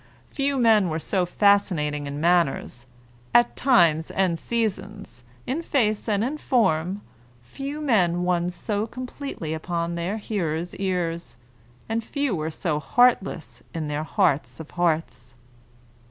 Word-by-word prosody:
Few 280 0 0
men 220 -6 +4
were 160 - -1
so 180 +2 0
fascinating 175 -8 +2
in 140 +1 -5
manners, 155 -7 +1 0.5
at 240 0 +5
times 170 - +3
and 180 -4 0
seasons, 210 - -3 0.2
in 285 +6 -2
face 220 -9 0
and 205 0 +1
in 290 +5 -2
form, 195 - +1 0.4
few 275 - -6
men 180 - +2
won 175 -1 +1
so 205 +4 -3
completely 255 - -6
upon 170 +1 -2
their 170 +5 -2
hearers' 175 -6 -3
ears, 170 -7 -2 0.5
and 225 +1 -1
few 280 -3 -1
were 155 -1 -2
so 155 -1 -2
heartless 200 - +1
in 155 -2 -3
their 150 +1 -2
hearts 160 -5 0
of 160 - -9
hearts. 160 -8 -1
180 Hz, 130 wpm, -24 LUFS, 160-225 Hz, 0.5 s, at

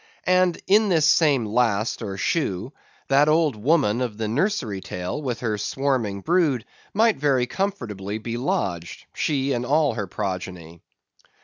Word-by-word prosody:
And 185 -1 +3
in 210 +2 +4
this 160 -5 +3
same 150 -7 +4
last 110 0 0
or 100 -3 -5
shoe, 115 - -1 0.4
that 140 +2 +4
old 155 -3 +3
woman 125 -1 +2
of 120 -5 -3
the 110 -1 -2
nursery 120 - -1
tale, 90 +12 -5
with 125 -5 -3
the 110 -4 -1
swarming 115 -4 -1
brood, 155 - +1 0.3
might 220 +1 +3
very 135 -3 +2
comfortably 115 - -3
be 115 +1 -5
lodged, 95 -9 -3
she 140 -2 0
and 120 -1 -1
all 145 +1 +2
her 105 -3 -4
progeny. 90 -4 -5
125 Hz, 145 wpm, -23 LUFS, 105-155 Hz, 0.4 s, in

